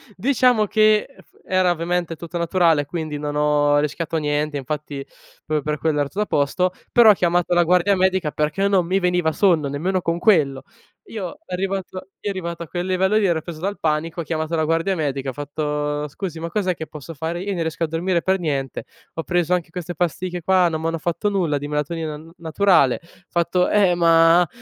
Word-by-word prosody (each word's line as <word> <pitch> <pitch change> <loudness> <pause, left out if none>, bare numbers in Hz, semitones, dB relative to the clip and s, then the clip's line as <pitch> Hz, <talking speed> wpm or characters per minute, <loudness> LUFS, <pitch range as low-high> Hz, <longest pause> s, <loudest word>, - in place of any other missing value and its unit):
diciamo 245 -1 +3
che, 215 0 +4
uhm, - - -17
f - - -31
era 185 -1 +2
ovviamente 175 0 -1
tutto 170 +2 -6
naturale 170 -3 +3
e - - -7
quindi 155 -1 -4
non 145 0 -4
ho 150 0 +3
rischiato 150 +3 -1
niente, 150 -1 -1
infatti 140 0 -5 0.4
proprio 155 -1 0
per 150 +1 -2
quello 150 0 0
era 145 - +1
tuta 210 +2 -1
a - - -6
posto; 180 +4 +1 0.2
però 230 -3 +7
ho - - +6
chiamato 175 -2 +1
la 175 0 +4
guardia 180 +3 +3
medica 185 -4 +1
perché 150 +6 0
non 190 -3 +2
mi 190 +2 +2
veniva 180 -3 +1
sonno, 165 -5 +2
nemmeno 180 +7 -1
con 165 0 -1
quello. 150 -9 +2 0.4
Io, 215 +4 -6
arrivato 190 0 -3 0.2
io 205 - -3
arrivato 170 -3 -5
a - - -11
quel 175 +3 -4
livello 190 +2 +1
lì 215 - +2
ero 165 -3 +1
preso 165 -3 -8
dal 200 +3 -3
panico, 160 +2 -1
ho - - -4
chiamato 160 +1 -2
la 160 - +1
guardia 165 +4 +1
medica, 140 -4 -2
ho 130 - -5
fatto: 150 +1 -3
"Scusi, 165 +2 -6
ma 170 +1 -4
cos'è 190 -3 0
che 160 -1 -7
posso 150 +2 -9
fare? 165 +4 -4
Io 200 - -3
non 175 -4 -2
riesco 160 +1 -2
a - - +1
dormire 170 +2 -1
per 190 0 +1
niente, 140 -6 -3 0.3
ho 165 - -3
preso 175 0 0
anche 175 -2 -1
queste 175 0 -6
pasticche 175 +2 -2
qua, 185 +1 +3
non 160 -1 -2
m'hanno 165 0 -1
fatto 175 +5 -1
nulla, 170 -8 0
di 145 - -5
melatonina 150 +1 -3
n 160 +2 -14
naturale." 165 -5 +2 0.3
Fatto: 175 +1 +1
"Eh, 195 -4 +4
ma 165 0 +5
170 Hz, 205 wpm, -21 LUFS, 150-185 Hz, 0.4 s, però